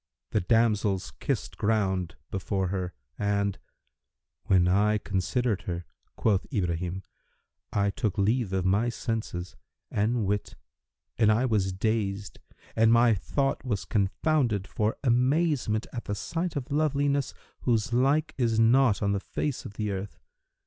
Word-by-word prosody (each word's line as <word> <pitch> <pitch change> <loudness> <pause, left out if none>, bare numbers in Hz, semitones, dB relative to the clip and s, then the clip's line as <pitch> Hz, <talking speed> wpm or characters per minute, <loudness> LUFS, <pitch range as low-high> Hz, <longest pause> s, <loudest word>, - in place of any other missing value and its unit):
The - - +2
damsels 105 -2 +2
kissed - - -3
ground 95 -5 0 0.2
before 95 -1 -1
her, 90 -3 -3 0.2
and, 100 -1 0 0.9
'When 90 -2 +4
I 105 +4 +3
considered 105 +3 -1
her" 85 0 -3 0.3
(quoth 105 +1 +1
Ibrahim), 90 - -2 0.7
"I 100 0 +1
took 105 -1 -2
leave 110 +1 +1
of 95 -1 0
my 100 +6 +2
senses 110 -7 -4 0.4
and 110 +2 +1
wit 105 +1 -2 0.6
and 110 -2 +5
I 115 +4 +2
was 105 -6 +1
dazed 100 0 -2 0.4
and 110 0 +5
my 115 0 +5
thought 135 +8 -1
was 110 -7 -2
confounded 105 +1 +1
for 105 +2 -1
amazement 130 -2 +2
at 120 - -5
the 105 - -2
sight 165 - -3
of 140 -1 -4
loveliness 145 -2 +1 0.2
whose 115 -2 0
like 135 +5 +2
is 115 -3 +2
not 115 -1 +4
on 100 - +2
the 100 - +1
face 140 +7 -3
of - - -7
the 105 -1 -2
earth. 95 -4 -5
105 Hz, 135 wpm, -28 LUFS, 95-120 Hz, 0.9 s, and